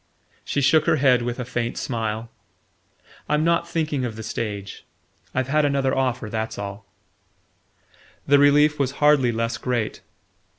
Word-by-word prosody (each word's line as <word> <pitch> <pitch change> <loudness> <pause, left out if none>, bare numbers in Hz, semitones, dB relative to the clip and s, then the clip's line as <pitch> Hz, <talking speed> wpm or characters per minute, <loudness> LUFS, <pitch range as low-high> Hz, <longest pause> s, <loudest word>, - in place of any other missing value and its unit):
She 140 - -1
shook 155 +3 +3
her - - +4
head 130 -4 +3
with 120 +1 -3
a 125 - -3
faint 120 -1 -3
smile. 115 -1 -3 1.0
"I'm 150 +1 +2
not 170 +1 +1
thinking 155 -5 -1
of 120 -3 -3
the 110 - -7
stage. 105 -3 -5 0.5
I've 130 0 0
had 150 +3 +2
another 140 -2 +1
offer: 130 -3 -1
that's 110 +1 -4
all." 100 0 -7 1.4
The 145 0 +5
relief 150 +1 +4
was 135 -1 0
hardly 145 -4 +3
less 115 -1 -2
great. 120 -4 -2
130 Hz, 145 wpm, -23 LUFS, 115-145 Hz, 1.4 s, The